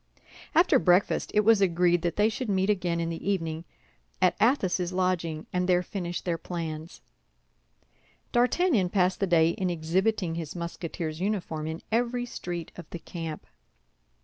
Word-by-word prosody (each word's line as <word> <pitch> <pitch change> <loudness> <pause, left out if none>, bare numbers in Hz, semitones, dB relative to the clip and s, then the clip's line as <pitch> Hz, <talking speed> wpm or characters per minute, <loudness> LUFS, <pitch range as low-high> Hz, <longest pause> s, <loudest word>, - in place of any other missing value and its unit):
After 325 -5 +5
breakfast, 180 0 +2
it 210 - +6
was 215 -1 +5
agreed 175 -2 +3
that 170 -1 -1
they 210 +1 +4
should 225 +2 -3
meet 190 +1 +2
again 175 -4 -1
in 165 0 -1
the 165 +4 -4
evening 165 -4 -2 0.5
at 185 -1 +3
Athos's 190 -7 +2
lodging, 180 -4 -1
and 180 0 0
there 180 0 +4
finish 175 -2 -4
their 170 -2 -2
plans. 165 -1 -6 1.3
D'Artagnan 245 - +2
passed 185 -1 +1
the 195 - +1
day 165 -2 +4
in 185 +1 -2
exhibiting 175 +3 0
his 165 -2 -5
Musketeer's 170 -2 -5
uniform 180 -6 -2
in 160 +1 -5
every 245 +2 0
street 175 -8 -6
of 170 -4 -10
the - - -6
camp. 165 -2 -7
180 Hz, 150 wpm, -27 LUFS, 165-200 Hz, 1.3 s, it